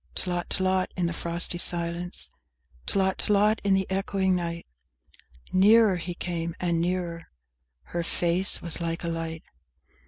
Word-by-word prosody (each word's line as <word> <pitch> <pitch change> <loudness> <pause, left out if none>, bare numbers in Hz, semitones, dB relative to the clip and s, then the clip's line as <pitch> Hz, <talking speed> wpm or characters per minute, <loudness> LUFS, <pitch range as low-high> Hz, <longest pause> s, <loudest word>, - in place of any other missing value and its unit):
VII - - 0
Tlot 175 0 -2
tlot, 185 -1 +1
in 180 - 0
the 170 - -1
frosty 170 +1 +1
silence! 175 0 +2 0.6
Tlot 190 -1 +1
tlot, 210 +1 +2
in 200 -1 +3
the 190 0 0
echoing 190 0 0
night! 170 -1 -4 0.9
Nearer 205 +1 +5
he 175 0 -6
came 170 -1 -4
and 170 -2 0
nearer! 175 -1 -2 0.6
Her 170 - -4
face 175 +3 0
was 170 0 +2
like 165 0 -3
a 170 - -1
light! 165 -1 -5
175 Hz, 145 wpm, -26 LUFS, 170-190 Hz, 0.9 s, Nearer